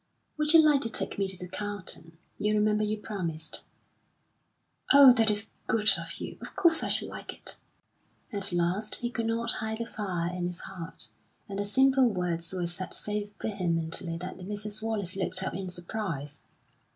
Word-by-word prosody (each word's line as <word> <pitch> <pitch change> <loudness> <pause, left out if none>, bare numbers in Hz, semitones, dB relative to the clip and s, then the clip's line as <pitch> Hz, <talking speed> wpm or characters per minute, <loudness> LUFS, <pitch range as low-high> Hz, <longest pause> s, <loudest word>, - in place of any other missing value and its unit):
"Would 300 +1 +2
you 330 - +10
like 295 -3 +5
to 230 - -1
take 225 - -1
me 195 - +2
to 190 -1 -4
the 180 - -6
Carlton? 185 -4 -4 0.2
You 210 +1 +2
remember 210 0 +3
you 215 +1 0
promised." 170 -7 -4 1.3
"Oh, 280 -3 +10
that 225 -2 +4
is 210 +1 0 0.2
good 215 -1 +4
of 165 -1 -5
you! - - -6
Of - - -9
course 330 -2 +5
I - - -1
should - - +1
like - - -6
it!" - - -6 0.7
At 200 -1 +2
last 175 +5 +1
he 240 0 -2
could 230 -2 -2
not 230 +1 +1
hide 220 0 -2
the 230 - -2
fire 180 -6 -2
in 175 -1 -1
his 175 -1 -6
heart, 175 -4 -5 0.4
and 200 -1 -4
the 205 - 0
simple 265 +4 +4
words 175 -4 -1
were 180 -2 -1
said 175 +2 -5
so 210 0 -3
vehemently 170 -4 -1
that 180 +2 -6
Mrs. 210 +2 -5
Wallace 210 -5 -2
looked 185 -1 +1
up - - -2
in 190 0 -4
surprise. 175 -6 -3
200 Hz, 180 wpm, -29 LUFS, 175-220 Hz, 1.3 s, you